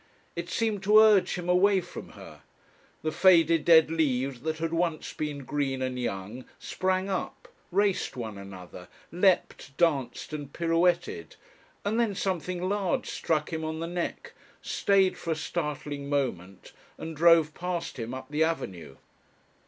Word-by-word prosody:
It 170 +1 -5
seemed 220 -1 -1
to 210 +2 +6
urge 210 -4 +6
him 180 -1 -5
away 190 +2 +4
from 180 - -9
her. - - -12 0.6
The 155 - 0
faded 165 -4 +5
dead 160 -1 +6
leaves 135 -5 0
that 160 +2 -2
had 165 +1 -3
once 165 -2 -1
been 145 -3 -4
green 135 -2 -1
and 130 -1 -3
young 115 +1 -4
sprang 185 0 -1
up, 190 -2 -4 0.2
raced 195 -6 +1
one 110 -4 -5
another, 95 -2 -10 0.2
leapt, 175 -6 +1
danced 145 -5 0
and 145 -2 -6
pirouetted, 175 - 0 0.5
and 215 +3 0
then 225 -4 +1
something 185 -1 -2
large 200 -2 -1
struck 155 0 -1
him 160 0 -3
on 160 0 -3
the 165 - -3
neck, 175 0 -4 0.3
stayed 195 -2 +2
for 170 - -7
a 160 - +1
startling 150 -3 -4
moment, 100 -10 -3 0.3
and 160 0 -7
drove 165 -1 +5
past 175 -5 -4
him 115 +1 -4
up 130 +2 -9
the 150 +2 +2
avenue. 95 - -3
165 Hz, 150 wpm, -28 LUFS, 140-180 Hz, 0.6 s, to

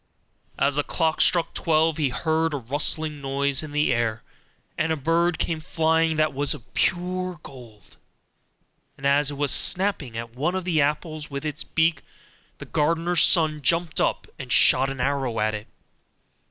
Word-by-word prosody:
As 140 +1 +1
the 145 +1 0
clock 160 0 -1
struck 170 -2 +2
twelve 160 -1 +1
he 150 -4 0
heard 160 +3 -1
a - - -1
rustling 145 +4 0
noise 140 0 -1
in 155 -2 -8
the 150 -3 +1
air, 115 -2 -2 0.5
and 160 +1 -1
a - - +1
bird 165 +4 0
came 160 -2 -2
flying 160 0 +1
that 155 -1 +1
was 140 0 -1
of 115 - -17
pure 180 -1 -1
gold; 115 -7 -14 1.0
and 135 - -9
as 140 +1 +3
it 145 - -6
was 145 -2 +2
snapping 175 - +2
at 115 0 -7
one 155 +8 -1
of 190 - -2
the 170 -4 +1
apples 150 +1 -2
with 140 +1 -6
its 150 -1 -3
beak, 160 -3 0 0.6
the - - -9
gardener's 165 +3 0
son 155 -3 +3
jumped 165 +3 0
up - - 0
and 130 -2 -7
shot 135 +1 +5
an 135 -1 -6
arrow 135 -3 -1
at 110 0 0
it. 105 +1 -6
150 Hz, 170 wpm, -24 LUFS, 135-165 Hz, 1.0 s, shot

